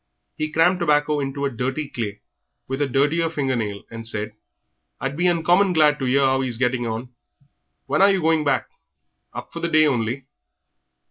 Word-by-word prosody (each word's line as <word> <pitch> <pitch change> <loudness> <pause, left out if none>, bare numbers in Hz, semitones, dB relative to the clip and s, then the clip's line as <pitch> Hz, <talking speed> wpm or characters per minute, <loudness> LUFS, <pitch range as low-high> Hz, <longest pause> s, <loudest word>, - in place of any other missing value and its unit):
He 155 0 -2
crammed 175 +3 +3
tobacco 150 -2 +2
into 140 0 -3
a 140 - -1
dirty 130 +5 -3
clay, 105 -6 -5 0.5
with 135 +2 -3
a 145 - +2
dirtier 145 +5 +1
finger 135 -5 -1
nail, 105 -4 -3
and 115 0 -6
said 105 -1 -4 0.7
"I'd 135 +1 -3
be 175 +3 +1
uncommon 175 +3 +3
glad 150 -2 +4
to 135 - -1
'ear 135 +2 +3
how 130 0 +2
he 130 - -1
is 120 -2 -3
getting 125 -1 0
on. 115 +3 -5 0.7
When - - +1
are 200 - +7
you 195 -1 +2
going 160 -2 +2
back? 140 -3 +1 0.6
Up - - -8
for - - -5
the 170 - -2
day 155 -1 +5
only?" 125 -1 -1
140 Hz, 190 wpm, -22 LUFS, 125-155 Hz, 0.7 s, are